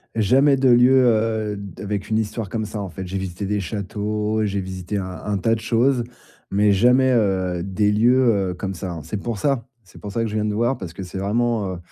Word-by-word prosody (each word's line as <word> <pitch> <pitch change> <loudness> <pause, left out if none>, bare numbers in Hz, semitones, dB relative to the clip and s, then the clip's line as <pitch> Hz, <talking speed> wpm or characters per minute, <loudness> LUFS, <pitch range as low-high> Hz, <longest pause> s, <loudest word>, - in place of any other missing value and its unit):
Jamais 135 +6 +4
de 130 0 +2
lieux, 125 +2 +6
heu, 110 -2 +1
d 100 -3 -9
avec 100 0 -4
une 110 - +1
histoire 110 -2 -3
comme 110 -1 -2
ça, 105 0 -5
en 95 - -5
fait. 95 +1 -7
J'ai 95 +2 -3
visité 95 +1 -4
des 105 0 -1
châteaux, 105 +2 -2
j'ai 100 -1 -1
visité 95 +1 -4
un 95 - -2 0.2
un 105 -1 -1
tas 115 +4 +1
de 110 - -7
choses, 120 +2 +2 0.5
mais 105 +1 +3
jamais, 125 +6 +4
heu, 95 -6 +1
des 105 +2 +1
lieux, 115 -4 +3
heu, - - -4
comme 95 +2 -4
ça. 85 -2 -5
C'est 95 - -5
pour 110 +1 -3
ça. 135 -2 0 0.2
C'est 95 - -16
pour 105 - -6
ça 115 - -1
que 115 - -1
je 105 - -5
viens 105 0 0
te 105 - -1
voir 120 +4 +1
parce 90 -3 -7
que 85 - -9
c'est 90 +1 -7
vraiment, 105 -1 0
heu, - - -7
105 Hz, 235 wpm, -22 LUFS, 95-115 Hz, 0.5 s, lieux